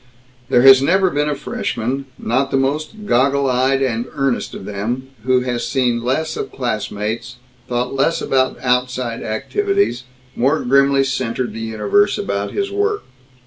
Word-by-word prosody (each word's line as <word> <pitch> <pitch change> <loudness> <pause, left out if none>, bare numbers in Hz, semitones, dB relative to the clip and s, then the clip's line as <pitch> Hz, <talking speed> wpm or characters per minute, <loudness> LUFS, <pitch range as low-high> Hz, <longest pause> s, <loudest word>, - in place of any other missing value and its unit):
There 120 - +4
has 135 -1 +9
never 185 +5 +3
been 150 +1 0
a 145 - -1
Freshman, 135 +1 -3
not 130 +4 0
the 135 - +1
most 155 +10 -2
goggle 140 -2 +2
eyed 130 +2 +2
and 120 -2 -1
earnest 135 -2 -1
of - - -8
them, 115 +7 -4 0.2
who 130 -1 +3
has 125 -1 -2
seen 125 -3 0
less 145 +6 -1
of - - -5
classmates, 110 -1 -3 0.3
thought 125 +1 -2
less 135 +5 +1
about 130 -1 +1
"outside 125 -1 0
activities," 395 - -1 0.3
more 140 +6 +2
grimly 140 +2 +3
centered 130 -2 -2
the - - -6
universe 110 - +1
about 100 0 -2
his 395 0 -2
work. 410 +1 0
130 Hz, 150 wpm, -19 LUFS, 120-140 Hz, 0.3 s, has